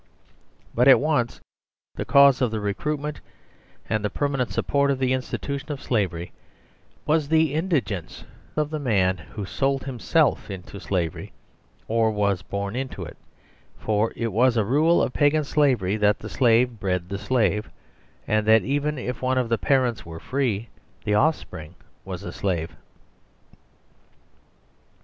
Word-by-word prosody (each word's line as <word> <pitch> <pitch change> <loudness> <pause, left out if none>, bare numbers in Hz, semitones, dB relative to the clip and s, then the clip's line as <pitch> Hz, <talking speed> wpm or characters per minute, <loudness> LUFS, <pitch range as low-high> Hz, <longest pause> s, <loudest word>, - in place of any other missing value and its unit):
But 125 +3 +3
at 135 - +8
once 145 -7 0 0.5
the - - -4
cause 140 -2 +6
of 125 - +3
the 110 0 -3
recruitment 145 +9 -3 0.7
and 110 0 -1
the 105 - 0
permanent 135 +1 -1
support 140 0 +1
of 140 - +1
theinstitution 130 +2 -2
of 145 -2 -4
slavery 90 -9 -1 0.7
was 155 -1 +2
the 160 -2 +3
indigence 115 - -2 0.3
of 150 0 -1
the 155 - -2
man 95 -9 +1
who 100 +4 -7
sold 135 +6 -1
himself 135 +1 +1
into 95 +1 -8
slavery, 85 -6 -3 0.5
or 115 0 +2
was 100 -3 0
born 100 +1 -4
into 130 +1 -4
it; - - -9 0.6
for 110 +1 0
it 115 -3 -3
was 120 +2 +3
a 110 - +2
rule 155 +9 +3
of 125 - -2
Pagan 150 +1 +3
Slavery 125 -10 +1
that 105 -1 +3
the - - -8
slave 120 -2 +2
bred 90 -3 -1
theslave, 105 +2 0 0.6
and 105 0 +1
that 110 0 +6
even 145 +2 -1
if 125 0 -5
one 130 0 +1
of 125 -2 0
the 115 - +2
parents 125 -5 +1
were 80 -1 -9
free 120 -4 -1 0.4
the 105 - +1
offspring 105 - 0 0.3
was - - -6
a - - -5
slave. 85 -5 -2
120 Hz, 145 wpm, -24 LUFS, 105-140 Hz, 0.7 s, at